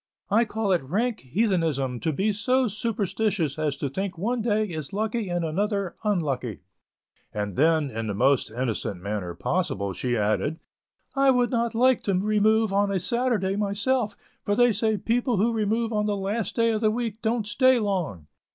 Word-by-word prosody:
I 225 +3 +4
call 220 -2 -1
it 180 - +3
rank 215 - -1
heathenism 155 - 0
to 160 - -1
be 200 +8 0
so 255 +5 +2
superstitious 205 - -1
as 150 -2 -1
to 140 - -2
think 185 +6 -4
one 230 +7 -1
day 215 -1 +1
is 160 -7 -5
lucky 220 0 -1
and 175 -1 -1
another 200 +3 -1
unlucky"; 140 - -1 0.7
and 105 -2 -3
then, 155 -1 +2
in 115 0 -4
the 100 - -2
most 130 +5 +2
innocent 115 -5 -3
manner 95 -3 -4
possible, 100 - -1
she 120 +4 -1
added: 110 +9 0 0.6
"I 275 0 +4
would 245 -2 +3
not 235 -2 0
like 255 +1 +4
to 195 - +1
remove 215 +2 +2
on 200 0 +2
a 195 - +1
Saturday 225 -1 0
myself, 210 +3 0 0.3
for 205 - 0
they 245 +2 +5
say 220 +1 +1
people 240 +2 0
who 230 +5 +2
remove 225 +1 0
on 210 0 +1
the 205 -1 0
last 200 +1 -2
day 230 -1 +3
of 215 -1 -1
the 215 - +4
week 225 -1 -3
don't 225 0 0
stay 255 +4 +4
long." 180 - -2
205 Hz, 180 wpm, -25 LUFS, 155-225 Hz, 0.7 s, they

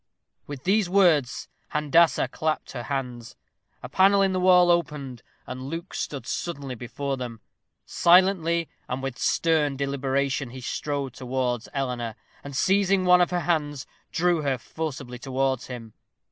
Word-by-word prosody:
With 145 -3 -7
these 195 0 +2
words 170 -9 +3 0.3
Handassah 150 -2 +3
clapped 155 0 -2
her 120 - -5
hands. 125 -4 -4 0.5
A - - -5
panel 195 +7 +4
in 190 -1 +1
the 185 - 0
wall 180 -1 +6
opened, 145 -7 -2 0.2
and 130 0 -7
Luke 165 +7 -6
stood 140 -2 -4
suddenly 145 -6 -4
before 130 +3 -4
them. 120 -3 -6 0.5
Silently 170 -2 +3 0.2
and 130 +2 -3
with 135 -3 -4
stern 155 -4 +1
deliberation 135 -1 -1
he 130 +2 -9
strode 140 0 -3
towards 125 -2 -2
Eleanor, 125 -5 -3 0.3
and 140 -1 -6
seizing 195 +1 +3
one 180 0 +6
of 175 - +3
her 180 -1 -1
hands, 145 -4 -1 0.3
drew 175 -1 +2
her 140 -3 0
forcibly 135 -3 -6
towards 130 0 -1
him. 115 -4 -8
140 Hz, 145 wpm, -25 LUFS, 130-170 Hz, 0.5 s, wall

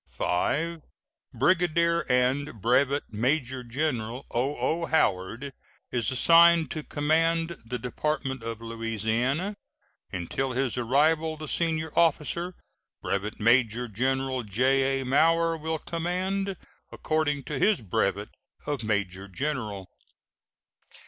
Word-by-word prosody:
V. 165 - -1 0.5
Brigadier 170 +4 +2
and 125 0 +1
Brevet 135 +5 +1
Major 130 +3 0
General 120 -2 -2
O.O. 140 +6 -1
Howard 120 -1 0 0.4
is 120 -3 0
assigned 165 +4 +5
to 155 - -3
command 165 +3 0
the 120 +2 -4
Department 135 +1 -3
of 115 0 -6
Louisiana. 115 - -1 0.6
Until 125 +9 -3
his 130 -1 -1
arrival 155 +6 +2
the 155 0 -7
senior 160 -2 -1
officer, 170 +2 +1 0.5
Brevet 100 +2 -2
Major 120 +1 +3
General 130 +4 -1
J.A. 135 +5 +1
Mower, 165 +5 +3
will 160 0 -3
command, 180 +4 -2 0.3
according 150 -3 -1
to 145 -1 -4
his 205 - +3
brevet 95 - -1 0.4
of 145 -4 -2
major 100 -3 -2
general. 105 -4 -3
135 Hz, 100 wpm, -27 LUFS, 120-160 Hz, 0.6 s, assigned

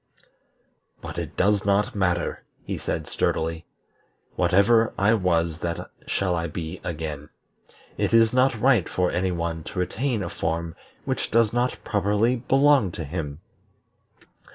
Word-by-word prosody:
"But - - -6
it - - -6
does 100 +1 +2
not 100 +1 +1
matter," 90 -3 -1 0.2
he - - -4
said - - -3
sturdily. 80 0 -1 0.7
"Whatever 110 +4 +3
I 100 +3 +4
was 85 -5 +1
that 85 -1 -4 0.2
shall 90 -2 0
I 85 0 -2
be 80 +2 -6
again. 75 -3 -5 0.7
It - - +1
is 115 0 +5
not 130 -2 +3
right 120 -6 +3
for 90 -1 0
any 95 +1 0
one 85 -2 -3
to - - -8
retain 110 +5 -1
a 85 - -4
form 80 0 -3 0.3
which - - -2
does 115 -1 +3
not 120 +1 0
properly 105 +4 +1
belong 135 -3 +3
to 80 - -5
him. 75 -1 -5
95 Hz, 140 wpm, -25 LUFS, 85-115 Hz, 0.7 s, is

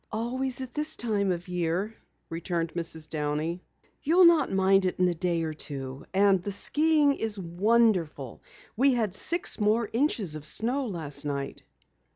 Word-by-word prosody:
"Always 255 +3 -2
at 255 -1 -7
this 305 +1 0
time 205 -5 0
of 175 +1 -4
year," 180 +4 -2 0.4
returned 165 -1 -3
Mrs. 160 -2 -2
Downey. 155 +3 -3 0.4
"You'll 350 +5 +5
not 340 -2 +4
mind 195 0 +3
it 180 - -3
in 180 - +3
a 175 - +1
day 170 0 -1
or 160 -1 -3
two. 135 -3 -6
And 195 -1 +3
the 200 - -4
skiing 300 +7 +2
is 220 -5 -2
wonderful. 180 - 0 0.3
We 265 +3 +3
had 220 -6 -1
six 345 - 0
more 215 +2 +2
inches 225 - 0
of 155 - -7
snow 245 - 0
last 155 -7 -4
night." 140 -1 -4
195 Hz, 160 wpm, -27 LUFS, 165-235 Hz, 0.4 s, You'll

